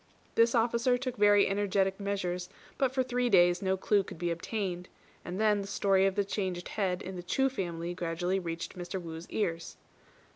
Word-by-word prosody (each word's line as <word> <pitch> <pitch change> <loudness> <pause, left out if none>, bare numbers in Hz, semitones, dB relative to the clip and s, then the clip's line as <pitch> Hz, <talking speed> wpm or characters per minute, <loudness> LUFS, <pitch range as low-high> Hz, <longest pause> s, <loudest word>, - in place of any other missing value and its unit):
This 230 +2 +4
officer 235 +2 +2
took 255 -1 -4
very 205 0 +5
energetic 195 -1 +1
measures, 180 -3 -2 0.3
but 265 -2 +2
for 260 -1 +1
three 250 -1 0
days 175 -3 +5
no 190 -1 +1
clue 205 +2 +2
could 190 - -9
be 175 +1 -1
obtained; 180 0 -3 0.3
and 180 +3 -5
then 210 -2 +3
the 195 - -6
story 195 -1 +3
of 195 - -1
the 205 -1 +1
changed 185 -3 -3
head 185 -4 -1
in 190 0 -6
the - - -5
Chu 265 +10 +1
family 175 -7 -4
gradually 175 +2 -1
reached 170 -2 -5
Mr. 180 +1 -5
Wu's 165 -1 -8
ears. 170 -6 -2
190 Hz, 185 wpm, -30 LUFS, 175-210 Hz, 0.3 s, very